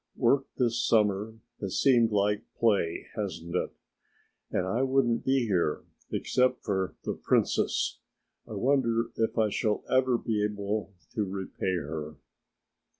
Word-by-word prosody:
Work 135 +2 +3
this 120 -2 +1
summer 105 -1 +2 0.2
has 100 -3 -2
seemed 120 -4 +4
like 105 0 +2 0.2
play, 100 -8 +1
hasn't 90 -5 -4
it? - - 0 0.8
And 90 - 0
I 110 +7 0
wouldn't 130 -3 +2
be 130 -2 +2
here, 90 -7 0 0.3
except 125 0 +1
for 95 -3 -1
The - - -1
Princess. - - +1 0.5
I - - -7
wonder 120 -4 +1
if 115 +1 0
I 110 -1 +3
shall 105 +1 0
ever 130 -1 +4
be 110 -3 -1
able 105 0 -2 0.2
to 110 - 0
repay 95 -1 -3
her?" 75 -1 -4
110 Hz, 135 wpm, -29 LUFS, 100-120 Hz, 0.8 s, seemed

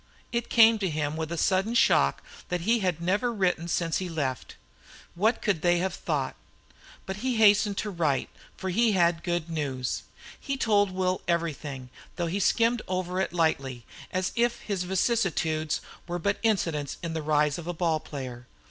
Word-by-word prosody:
It 235 0 -2
came 225 -1 +6
to 190 -3 0
him 150 -1 -2
with 160 0 -4
a 170 - -2
sudden 195 +7 +1
shock 70 - +3 0.3
that 180 -1 -1
he 230 +6 +2
had 180 -5 -1
never 205 +7 +1
written 180 -5 0
since 165 -1 0
he 185 -1 -4
left. 140 -7 -3 0.6
What 215 +7 +1
could 200 -8 +1
they 175 0 +3
have 185 +1 -1
thought? - - -2 0.7
But 190 0 -4
he 250 +3 -1
hastened 205 -2 +5
to 210 - -2
write, 155 -7 0 0.3
for 190 - -3
he 225 +3 +3
had 170 -3 +3
good 175 -2 -2
news. 140 -6 -2 0.4
He 275 -1 -3
told 205 -5 +3
Will 185 0 -1
everything, 150 -6 -2 0.2
though 175 - -1
he 175 +4 -1
skimmed 230 +3 +2
over 185 0 -1
it - - -1
lightly, 140 -8 0 0.3
as 185 0 -1
if 240 0 +1
his 195 -4 -2
vicissitudes 175 -6 0 0.3
were 175 0 -2
but 200 +4 -1
incidents 165 - 0
in 165 -1 -3
the 160 - -2
rise 150 0 +1
of 170 - -8
a - - 0
ball 165 -2 +1
player. 130 -5 -7
175 Hz, 175 wpm, -27 LUFS, 155-205 Hz, 0.7 s, came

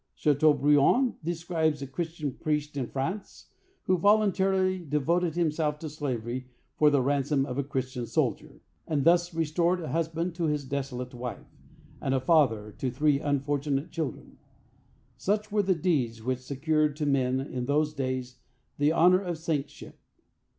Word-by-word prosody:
Chateaubriand 150 - +3
describes 160 -3 -1
a - - -3
Christian 155 +1 -4
priest 150 0 -2
in 130 -4 -2
France 170 - -5 0.3
who 185 -1 +1
voluntarily 190 -2 +3
devoted 165 +2 0
himself 155 -3 0
to 155 0 -6
slavery 125 -4 -4 0.3
for 150 - +5
the 140 -3 +2
ransom 140 0 +1
of 130 0 -4
a - - +1
Christian 130 -3 -3
soldier, - - -2 0.3
and 145 -3 0
thus 175 +1 +4
restored 170 +2 +1
a 160 - -5
husband 165 +2 -1
to 170 0 -2
his 150 -2 -1
desolate 130 -2 -4
wife, 125 0 -7 0.5
and 135 0 0
a - - +2
father 130 -8 +2
to 130 - -1
three 140 +3 +2
unfortunate 145 +1 -1
children. 160 -4 -5 0.8
Such 210 +2 -1
were 210 0 +3
the 190 -2 +1
deeds 130 -10 0
which 130 +1 -1
secured 150 +3 0
to 150 -1 -2
men 130 -2 +1
in 130 -2 -4
those 150 +1 +1
days 130 -3 -3 0.4
the 145 +1 +4
honor 180 +3 +5
of 175 -4 -3
saintship. 155 -3 -4
150 Hz, 150 wpm, -28 LUFS, 135-170 Hz, 0.8 s, for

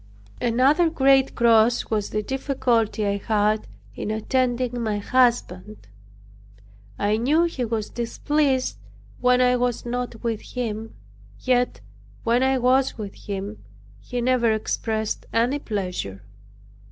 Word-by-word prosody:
Another 270 +8 +3
great 270 -3 +3
cross 230 0 +3
was 210 -2 0
the 215 0 -2
difficulty 245 -4 0
I 200 0 0
had 215 +1 0 0.3
in 205 - -5
attending 245 +2 0
my 215 -2 -1
husband. 215 - 0 1.1
I 210 +1 +1
knew 290 +9 +3
he 330 -7 -2
was 220 -2 -3
displeased 265 +3 0 0.4
when 250 0 +3
I 250 0 +4
was 245 -1 -1
not 245 -1 -4
with 230 -2 -2
him; 225 -3 -5 0.4
yet 250 - +1 0.4
when 235 +2 +2
I 265 0 +3
was 255 +2 +2
with 205 -3 -6
him, 200 +1 -6 0.4
he 245 - -4
never 240 -2 +2
expressed 220 0 -2
any 240 +5 +1
pleasure. 180 - -4
235 Hz, 120 wpm, -23 LUFS, 215-255 Hz, 1.1 s, I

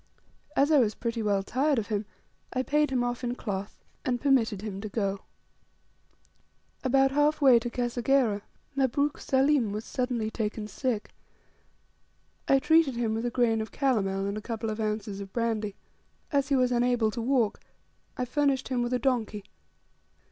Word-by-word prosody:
As 285 +3 +3
I 300 - +6
was 220 -4 +2
pretty 230 -1 -3
well 200 -2 +1
tired 275 +7 +1
of 225 -1 -2
him, 210 -1 -2 0.4
I 255 +1 -1
paid 300 +2 +2
him 255 -2 +1
off 245 +1 -3
in 245 0 -1
cloth, 200 -4 -5 0.3
and 245 -1 0
permitted 230 -7 +2
him 200 -2 -5
to 215 - -5
go. 200 -2 -1 1.6
About 270 +1 +3
half 295 +2 +2
way 265 -5 +7
to 240 +1 -4
Kasegera 240 -2 +1 0.3
Mabruk 280 +2 +1
Saleem 265 -3 +2
was 210 +2 -4
suddenly 245 -4 -2
taken 215 -1 -3
sick. 235 -2 -3 1.4
I 270 - +5
treated 300 -1 +3
him 235 -2 0
with 225 +2 -1
a - - +1
grain 230 -2 +2
of 220 -2 -6
calomel, 195 -8 0
and 200 +2 -2
a - - -11
couple 225 0 -3
of 215 - -5
ounces 210 -2 -2
of 195 -1 -8
brandy. 220 -3 -1 0.6
As 280 -2 +1
he 280 - +3
was 255 -1 +2
unable 240 -2 +2
to 235 - -4
walk, 240 -3 +1 0.6
I 250 - -1
furnished 270 0 0
him 250 -2 0
with 240 +1 -1
a - - +3
donkey. 225 -5 -1
240 Hz, 170 wpm, -28 LUFS, 215-265 Hz, 1.6 s, way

